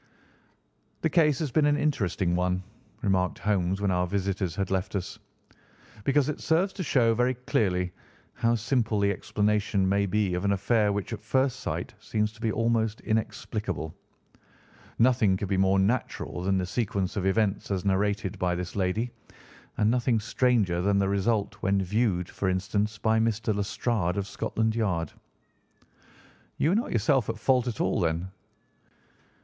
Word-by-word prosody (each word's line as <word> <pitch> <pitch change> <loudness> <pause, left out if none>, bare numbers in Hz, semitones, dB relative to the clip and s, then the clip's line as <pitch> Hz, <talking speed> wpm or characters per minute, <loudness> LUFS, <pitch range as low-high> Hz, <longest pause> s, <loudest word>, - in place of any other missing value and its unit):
"The 160 - +1
case 150 -5 +4
has 150 -3 -2
been 150 +4 +3
an 145 0 +3
interesting 95 - 0
one," 90 +1 0 0.4
remarked 95 -3 +1
Holmes 95 -2 0
when 100 -2 +1
our 90 0 +1
visitors 95 -2 -2
had 95 -2 -2
left 95 +2 -1
us, 90 -2 -4 0.9
"because 140 0 +3
it 150 - -3
serves 175 +4 +1
to 195 - -5
show 120 -7 +3
very 125 +3 +1
clearly 90 -7 0 0.4
how 115 0 +1
simple 115 -2 0
the 100 0 +3
explanation 105 0 0
may 100 +1 +2
be 100 -1 +1
of 90 +1 -2
an 100 0 +2
affair 105 +2 +2
which 100 +2 -3
at 105 - -6
first 130 +4 +1
sight - - -4
seems 105 0 -1
to 110 0 -18
be 110 -2 +1
almost 115 -1 0
inexplicable. 105 -7 -3 1.0
Nothing 115 -5 +3
could 100 0 -4
be 100 - +1
more 95 0 +3
natural 100 -2 -1
than 95 +1 +1
the 90 - 0
sequence 95 -1 -2
of 95 -1 0
events 100 0 +1
as 95 -1 -2
narrated 100 0 0
by 90 -1 +1
this 90 0 -5
lady, 100 +5 0 0.7
and 110 0 +3
nothing 120 -1 +2
stranger 105 -6 +1
than 100 +2 +2
the 100 -1 +2
result 100 +1 0
when 100 +1 +2
viewed, 95 -2 0
for 95 - -2
instance, 100 +3 -1
by 110 +1 +2
Mr. 110 -1 0
Lestrade 100 -2 -1
of 100 - -1
Scotland 110 +2 -1
Yard." 90 -9 -1 1.5
"You 155 - +2
were 185 - +3
not 230 - 0
yourself 115 +1 +2
at 115 - -2
fault 125 +2 +2
at 120 - -3
all, - - +1
then?" 85 +1 -1
105 Hz, 165 wpm, -27 LUFS, 95-115 Hz, 1.5 s, case